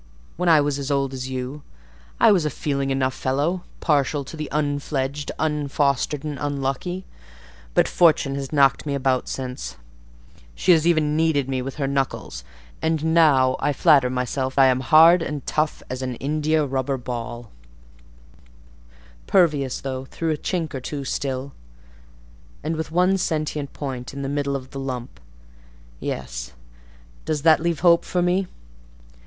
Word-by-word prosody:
When 180 Hz, 0 st, +1 dB
I 160 Hz, -2 st, +6 dB
was 145 Hz, -1 st, -1 dB
as 140 Hz, 0 st, -4 dB
old 140 Hz, -1 st, 0 dB
as 130 Hz, 0 st, -5 dB
you, 130 Hz, +3 st, -5 dB, 0.6 s
I -, -, +6 dB
was 185 Hz, -5 st, +3 dB
a 150 Hz, -, 0 dB
feeling 140 Hz, 0 st, -2 dB, 0.2 s
fellow 135 Hz, +5 st, 0 dB
enough; 180 Hz, -1 st, -8 dB
partial 145 Hz, -2 st, +1 dB
to 135 Hz, -, -9 dB
the 155 Hz, -1 st, -5 dB
unfledged, 145 Hz, -1 st, -2 dB
unfostered, 145 Hz, -2 st, 0 dB
and 150 Hz, -3 st, -5 dB
unlucky; 145 Hz, +6 st, -3 dB, 0.7 s
but -, -, +4 dB
Fortune 155 Hz, -5 st, +3 dB
has 135 Hz, -1 st, -4 dB
knocked 140 Hz, -1 st, +3 dB
me 140 Hz, -, -1 dB
about 130 Hz, -2 st, 0 dB
since: 125 Hz, -, -5 dB, 0.8 s
she 185 Hz, -, +3 dB
has 165 Hz, -1 st, +4 dB
even 155 Hz, -3 st, +2 dB
kneaded 155 Hz, -4 st, +2 dB
me 130 Hz, -1 st, -1 dB
with 135 Hz, +1 st, -5 dB
her 145 Hz, -, -2 dB
knuckles, 135 Hz, -, -2 dB, 0.4 s
and 160 Hz, 0 st, 0 dB
now 135 Hz, -6 st, +5 dB
I 145 Hz, -, +1 dB
flatter 140 Hz, -4 st, +4 dB
myself 130 Hz, +1 st, -2 dB
I 135 Hz, -, +7 dB
am 130 Hz, -1 st, +3 dB
hard 165 Hz, +5 st, +6 dB
and 150 Hz, -4 st, -4 dB
tough 155 Hz, 0 st, -1 dB
as 130 Hz, 0 st, -5 dB
an 130 Hz, -1 st, -3 dB
India 155 Hz, +3 st, 0 dB
rubber 135 Hz, 0 st, -1 dB
ball; 120 Hz, -2 st, -6 dB, 1.8 s
pervious, 150 Hz, -8 st, +2 dB
though, 130 Hz, -1 st, -4 dB
through 165 Hz, +4 st, -3 dB
a 155 Hz, -, -1 dB
chink 165 Hz, -1 st, -3 dB
or 130 Hz, -, -4 dB
two 140 Hz, +2 st, -5 dB
still, 135 Hz, 0 st, -3 dB, 1.1 s
and 160 Hz, +2 st, -1 dB
with 160 Hz, 0 st, -4 dB
one 180 Hz, +3 st, +2 dB
sentient 155 Hz, -4 st, -2 dB
point 130 Hz, -2 st, -6 dB
in 140 Hz, -, -4 dB
the -, -, -2 dB
middle 140 Hz, -1 st, -1 dB
of 130 Hz, -1 st, -6 dB
the 135 Hz, -, -6 dB
lump. 125 Hz, -, -5 dB, 0.8 s
Yes: -, -, -5 dB, 0.7 s
does 155 Hz, -2 st, -2 dB
that 160 Hz, -3 st, +6 dB
leave 170 Hz, -1 st, -1 dB
hope 170 Hz, -1 st, +5 dB
for 180 Hz, -1 st, -1 dB
me?" 180 Hz, +2 st, +1 dB
140 Hz, 155 wpm, -23 LUFS, 130-155 Hz, 1.8 s, I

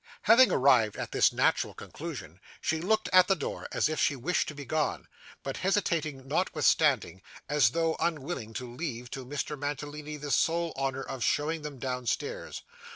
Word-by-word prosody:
Having 235 Hz, +4 st, +7 dB
arrived 125 Hz, -6 st, +4 dB
at -, -, -5 dB
this -, -, +4 dB
natural -, -, +1 dB
conclusion, 110 Hz, -, -8 dB, 0.2 s
she 160 Hz, 0 st, -1 dB
looked 220 Hz, +5 st, +1 dB
at 185 Hz, -1 st, +7 dB
the 195 Hz, -, +3 dB
door, 150 Hz, -, -5 dB
as -, -, +2 dB
if 155 Hz, 0 st, -2 dB
she 145 Hz, -, +2 dB
wished 140 Hz, +8 st, 0 dB
to 155 Hz, -, -6 dB
be 145 Hz, -1 st, -7 dB
gone, 155 Hz, +3 st, -1 dB, 0.4 s
but 135 Hz, -, -4 dB
hesitated 165 Hz, -8 st, 0 dB
notwithstanding, 140 Hz, -, +2 dB, 0.3 s
as 145 Hz, -6 st, +4 dB
though 165 Hz, +4 st, 0 dB
unwilling 150 Hz, -8 st, -2 dB
to 125 Hz, -1 st, -4 dB
leave 125 Hz, -6 st, -5 dB
to 135 Hz, -, -5 dB
Mr 145 Hz, +3 st, -4 dB
Mantalini 145 Hz, +1 st, -5 dB
the 145 Hz, -1 st, -5 dB
sole 170 Hz, +2 st, +1 dB
honour 135 Hz, 0 st, -2 dB
of 130 Hz, -2 st, -5 dB
showing 155 Hz, +2 st, 0 dB
them 150 Hz, -2 st, -7 dB
downstairs. 130 Hz, -, -3 dB
145 Hz, 165 wpm, -29 LUFS, 130-165 Hz, 0.4 s, Having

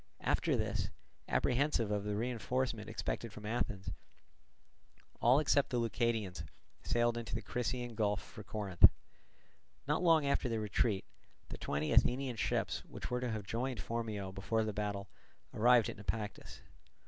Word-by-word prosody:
After -, -, +2 dB
this, -, -, -1 dB, 0.4 s
apprehensive 125 Hz, -4 st, +1 dB
of 105 Hz, -1 st, -1 dB
the 105 Hz, 0 st, -1 dB
reinforcement 120 Hz, 0 st, -1 dB
expected 115 Hz, -, -3 dB
from 105 Hz, +1 st, -10 dB
Athens, 105 Hz, -3 st, -2 dB, 1.3 s
all 125 Hz, +3 st, +6 dB
except 145 Hz, -2 st, +3 dB
the 125 Hz, -, 0 dB
Leucadians 115 Hz, -6 st, 0 dB, 0.4 s
sailed 120 Hz, 0 st, +1 dB
into 115 Hz, 0 st, -5 dB
the 115 Hz, -, -2 dB
Crissaean 125 Hz, 0 st, -2 dB
Gulf 105 Hz, -3 st, +1 dB
for 105 Hz, -, -11 dB
Corinth. 95 Hz, -3 st, +5 dB, 1.0 s
Not 150 Hz, +3 st, +1 dB
long 165 Hz, -4 st, +5 dB
after 140 Hz, -2 st, +1 dB
their 115 Hz, -1 st, 0 dB
retreat, 105 Hz, -1 st, 0 dB, 0.4 s
the -, -, -6 dB
twenty 75 Hz, +1 st, -1 dB
Athenian 125 Hz, -1 st, +3 dB
ships, -, -, 0 dB
which -, -, -7 dB
were 125 Hz, 0 st, 0 dB
to 125 Hz, -, -1 dB
have 110 Hz, -2 st, -3 dB
joined 120 Hz, +4 st, -2 dB
Phormio 110 Hz, -4 st, -3 dB
before 105 Hz, +4 st, 0 dB
the 110 Hz, -1 st, -2 dB
battle, 100 Hz, -1 st, -3 dB, 0.5 s
arrived 120 Hz, +1 st, +5 dB
at -, -, -5 dB
Naupactus. 105 Hz, +1 st, -5 dB
115 Hz, 145 wpm, -35 LUFS, 105-125 Hz, 1.3 s, all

